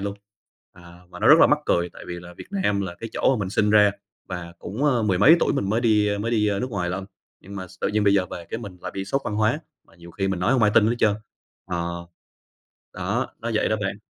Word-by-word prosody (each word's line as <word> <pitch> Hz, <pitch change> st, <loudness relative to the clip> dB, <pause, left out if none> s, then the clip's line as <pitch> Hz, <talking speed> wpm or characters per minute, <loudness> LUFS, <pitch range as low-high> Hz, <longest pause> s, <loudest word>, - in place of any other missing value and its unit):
luôn. 100 Hz, 0 st, -4 dB, 0.6 s
À, 85 Hz, 0 st, -15 dB
và -, -, -10 dB
nó -, -, +3 dB
rất -, -, +9 dB
là -, -, +8 dB
mắc -, -, +3 dB
cười 85 Hz, 0 st, +1 dB
tại -, -, -12 dB
vì 90 Hz, -, -4 dB
là 90 Hz, 0 st, -12 dB
Việt -, -, -9 dB
Nam 185 Hz, -, 0 dB
là 95 Hz, -3 st, -4 dB
cái 115 Hz, -, -5 dB
chỗ 135 Hz, -, +2 dB
mà -, -, -4 dB
mình 95 Hz, -2 st, -3 dB
sinh 105 Hz, +1 st, +2 dB
ra 105 Hz, -1 st, +6 dB, 0.4 s
và 90 Hz, -2 st, -6 dB
cũng, 110 Hz, +10 st, -4 dB
ơ, 130 Hz, -6 st, +2 dB
mười 95 Hz, -4 st, +1 dB
mấy 140 Hz, -, +7 dB
tuổi -, -, +2 dB
mình 100 Hz, -9 st, -1 dB
mới 110 Hz, +3 st, +1 dB
đi 105 Hz, -3 st, +2 dB
mới 110 Hz, +3 st, -2 dB
đi 105 Hz, -3 st, +2 dB
nước 125 Hz, +1 st, -3 dB
ngoài 90 Hz, -5 st, -2 dB
lận. 95 Hz, +1 st, -4 dB, 0.4 s
Nhưng 100 Hz, +1 st, -10 dB
mà 95 Hz, -1 st, -6 dB
s -, -, -19 dB
tự -, -, 0 dB
nhiên 105 Hz, 0 st, 0 dB
bây 100 Hz, -1 st, +4 dB
giờ 95 Hz, -2 st, +2 dB
về 85 Hz, -2 st, -8 dB
cái -, -, -3 dB
mình 100 Hz, -6 st, -9 dB
lại -, -, -5 dB
bị 95 Hz, -, -3 dB
sốc 135 Hz, +8 st, -1 dB
văn 105 Hz, -, -3 dB
hóa 110 Hz, +8 st, +1 dB, 0.2 s
và -, -, -24 dB
nhiều 85 Hz, 0 st, -13 dB
khi 95 Hz, +3 st, -2 dB
mình 95 Hz, -2 st, -2 dB
nói 90 Hz, -, +2 dB
hông 130 Hz, -3 st, +2 dB
ai 105 Hz, 0 st, +4 dB
tin 105 Hz, -, +6 dB
hết 115 Hz, +2 st, +1 dB
trơn. 105 Hz, -3 st, +3 dB, 0.5 s
Ờ, 85 Hz, -1 st, -4 dB, 0.9 s
đó, -, -, -1 dB
nó 115 Hz, -, -3 dB
vậy 110 Hz, -, +2 dB
đó 110 Hz, -, +1 dB
bạn. 100 Hz, 0 st, -3 dB
100 Hz, 275 wpm, -24 LUFS, 90-110 Hz, 0.9 s, rất